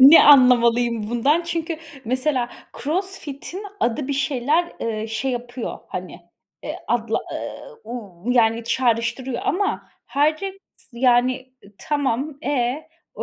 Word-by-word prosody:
Ne 280 Hz, +5 st, +10 dB
anlamalıyım 240 Hz, -5 st, +5 dB
bundan? 280 Hz, +8 st, +2 dB
Çünkü 335 Hz, -1 st, -3 dB, 0.3 s
mesela 255 Hz, +1 st, 0 dB, 0.3 s
Crossfit'in 360 Hz, +1 st, -3 dB, 0.2 s
adı 255 Hz, +4 st, 0 dB
bir 280 Hz, -, 0 dB
şeyler, 280 Hz, +5 st, +1 dB
eee, 220 Hz, -1 st, -2 dB
şey 225 Hz, +4 st, -2 dB
yapıyor, 245 Hz, 0 st, -4 dB
hani, -, -, -6 dB, 0.4 s
eee, -, -, -5 dB
adla, 230 Hz, -2 st, +1 dB, 0.2 s
ııı, 475 Hz, -2 st, -7 dB
uuu, 220 Hz, -2 st, -5 dB
yani, 230 Hz, -1 st, +3 dB
çağrıştırıyor 240 Hz, +1 st, 0 dB
ama 395 Hz, +4 st, 0 dB, 0.2 s
Hyrox 310 Hz, +7 st, 0 dB, 0.3 s
yani, 245 Hz, +1 st, +4 dB, 0.3 s
eee, 200 Hz, -, -17 dB
tamam. 285 Hz, 0 st, -1 dB
E? 260 Hz, +1 st, 0 dB, 0.3 s
O -, -, -4 dB
255 Hz, 120 wpm, -22 LUFS, 235-295 Hz, 0.4 s, Ne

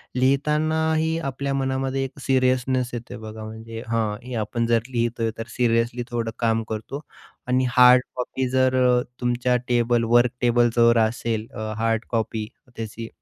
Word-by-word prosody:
लिहितानाही 155 Hz, +4 st, +1 dB
आपल्या 140 Hz, +1 st, -3 dB
मनामध्ये 135 Hz, 0 st, -1 dB
एक 135 Hz, -, -10 dB
सीरीयसनेस 130 Hz, -1 st, +1 dB
येतंय 120 Hz, +1 st, -6 dB
बघा 110 Hz, 0 st, -8 dB
म्हणजे 115 Hz, +1 st, -8 dB
हां, 110 Hz, -2 st, -1 dB
हे 125 Hz, -, -8 dB
आपण 115 Hz, +3 st, -1 dB
जर 115 Hz, -1 st, +3 dB
लिहितोय 115 Hz, -2 st, -1 dB
तर 115 Hz, -, -5 dB
सिरीयसली 120 Hz, 0 st, +1 dB
थोडं 115 Hz, -1 st, -2 dB
काम 115 Hz, -1 st, +1 dB
करतो 110 Hz, +6 st, -5 dB, 0.5 s
आणि 130 Hz, +1 st, +2 dB
हार्ड 125 Hz, 0 st, +8 dB
कॉपी 130 Hz, +1 st, -2 dB
जर 130 Hz, 0 st, +2 dB
अ, 125 Hz, 0 st, +4 dB, 0.2 s
तुमच्या 120 Hz, 0 st, +1 dB
टेबल 120 Hz, -1 st, +2 dB
वर्क 120 Hz, 0 st, +5 dB
टेबलवर 120 Hz, -1 st, +4 dB
असेल 110 Hz, 0 st, -1 dB
अ, 110 Hz, 0 st, -4 dB
हार्ड 115 Hz, 0 st, 0 dB
कॉपी 110 Hz, -2 st, -2 dB, 0.3 s
त्याची, 115 Hz, 0 st, -6 dB
120 Hz, 145 wpm, -23 LUFS, 115-130 Hz, 0.5 s, हार्ड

